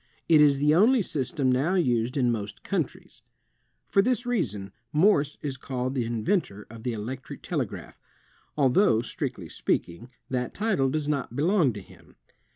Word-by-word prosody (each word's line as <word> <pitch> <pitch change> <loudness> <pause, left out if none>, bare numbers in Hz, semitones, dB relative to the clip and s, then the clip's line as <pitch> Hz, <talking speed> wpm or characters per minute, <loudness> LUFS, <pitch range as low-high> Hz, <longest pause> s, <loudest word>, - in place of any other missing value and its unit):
It 155 -2 +6
is 145 -2 +5
the 150 +2 +3
only 220 +7 +5
system 140 -3 0
now 140 +9 +1
used 125 -7 +1
in 125 -3 +2
most 105 -2 -5
countries. - - -4 0.7
For 195 - +4
this 245 +3 0
reason, 105 - -2 0.2
Morse 150 -3 +3
is 140 -3 -3
called 130 -1 -3
the 125 -4 -1
inventor 115 - -1
of 115 -1 -10
the 125 +1 -2
electric 120 +5 -7
telegraph, - - -4 0.6
although, 130 - +3
strictly 125 - -5
speak - - -1
ing, 95 +9 -12 0.2
that 125 -1 -3
title 195 -11 +1
does 150 +1 -2
not 140 -5 -2
belong 160 -1 +3
to 105 - -7
him. - - -19
135 Hz, 160 wpm, -26 LUFS, 120-160 Hz, 0.7 s, It